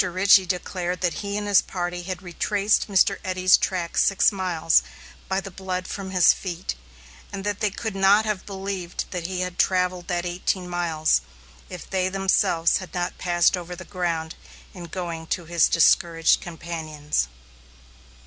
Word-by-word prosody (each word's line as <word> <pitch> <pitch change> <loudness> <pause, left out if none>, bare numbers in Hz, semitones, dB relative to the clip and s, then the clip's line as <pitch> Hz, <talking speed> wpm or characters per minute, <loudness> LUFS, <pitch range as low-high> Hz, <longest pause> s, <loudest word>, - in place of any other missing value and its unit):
Richey 185 +1 +4
declared 180 -1 -3
that 175 -2 +1
he 200 0 -3
and 205 0 -3
his 200 -2 +5
party 175 -1 -4
had 185 +1 -6
retraced 200 +4 0
Mr. 195 -3 +3
Eddy's 185 0 +4
track 175 -3 -2
six 195 - +4
miles, 180 -4 +2 0.5
by 190 0 +1
the 195 0 -8
blood 185 0 -4
from 195 -2 -6
his 180 -3 +5
feet; 175 - -5 0.6
and 195 -1 -6
that 205 0 -2
they 210 - +1
could 220 +1 -5
not 195 +3 +4
have 210 -3 -2
believed 195 -3 -4
that 175 -2 -4
he 185 -1 -3
had 180 -1 -4
travelled 180 -1 +1
that 175 -1 -2
eighteen 180 +1 -2
miles, 165 -3 +1 0.5
if 180 -2 -9
they 185 -1 0
themselves 190 -3 +2
had 185 0 -9
not 175 0 -3
passed 175 0 +3
over 180 0 -7
the 185 +1 -10
ground 170 -4 -3 0.4
in 180 -3 -9
going 170 -2 -5
to 175 - -2
his 170 0 +3
discouraged 165 0 +3
companions. 160 -3 -3
180 Hz, 160 wpm, -24 LUFS, 175-195 Hz, 0.6 s, his